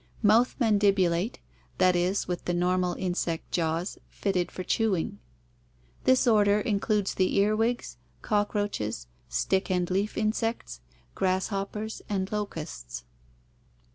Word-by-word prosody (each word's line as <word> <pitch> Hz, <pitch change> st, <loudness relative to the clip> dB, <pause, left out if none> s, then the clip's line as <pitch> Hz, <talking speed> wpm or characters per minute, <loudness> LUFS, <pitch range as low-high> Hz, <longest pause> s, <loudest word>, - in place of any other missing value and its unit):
Mouth 225 Hz, +4 st, +4 dB
mandibulate, 200 Hz, -3 st, +2 dB, 0.4 s
that 185 Hz, -1 st, +4 dB
is, 180 Hz, +3 st, +1 dB
with 180 Hz, -1 st, -3 dB
the 175 Hz, -, 0 dB
normal 180 Hz, 0 st, +1 dB
insect 175 Hz, -3 st, -2 dB
jaws, 165 Hz, +2 st, -1 dB
fitted 185 Hz, -3 st, -1 dB
for 185 Hz, -, -5 dB
chewing. 185 Hz, -, 0 dB, 0.9 s
This 260 Hz, 0 st, +4 dB
order 210 Hz, -3 st, +4 dB
includes 205 Hz, -1 st, 0 dB
the 185 Hz, -1 st, +1 dB
earwigs, 215 Hz, +4 st, +1 dB, 0.3 s
cockroaches, 205 Hz, -, -1 dB, 0.2 s
stick 60 Hz, -, 0 dB
and 180 Hz, -1 st, +1 dB
leaf 200 Hz, +3 st, 0 dB
insects, 215 Hz, -, -1 dB, 0.3 s
grasshoppers, 195 Hz, +3 st, -2 dB
and 190 Hz, -2 st, -1 dB
locusts. 165 Hz, -, -5 dB
195 Hz, 110 wpm, -28 LUFS, 180-210 Hz, 0.9 s, Mouth